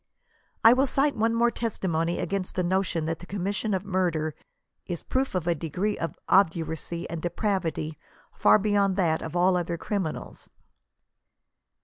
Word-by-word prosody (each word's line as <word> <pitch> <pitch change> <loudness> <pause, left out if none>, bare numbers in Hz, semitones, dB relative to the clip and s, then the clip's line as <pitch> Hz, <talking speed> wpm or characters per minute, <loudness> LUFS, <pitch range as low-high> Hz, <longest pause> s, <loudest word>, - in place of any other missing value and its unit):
I 225 - +9
will 265 +2 +3
cite 275 +2 +2
one 225 +1 +1
more 235 +1 +3
testimony 175 -8 -1
against 195 -2 -3
the 180 - +1
notion 175 -3 0
that 160 0 -2
the 180 - -11
commission 200 +3 -2
of 190 +1 -3
murder 175 -5 0 0.5
is 175 -3 -4
proof 265 -4 -1
of 180 -3 -1
a 175 - +2
degree 175 +6 -2
of 165 - -4
obduracy 165 -2 +1
and 165 -1 -5
der 175 - -1
pravity 170 -7 -2 0.4
far - - +5
beyond 200 -2 +2
that 165 -5 +1
of 160 +1 -6
all 180 +1 +4
other 170 -1 -1
criminals. 190 -4 -4
185 Hz, 155 wpm, -27 LUFS, 165-205 Hz, 0.5 s, I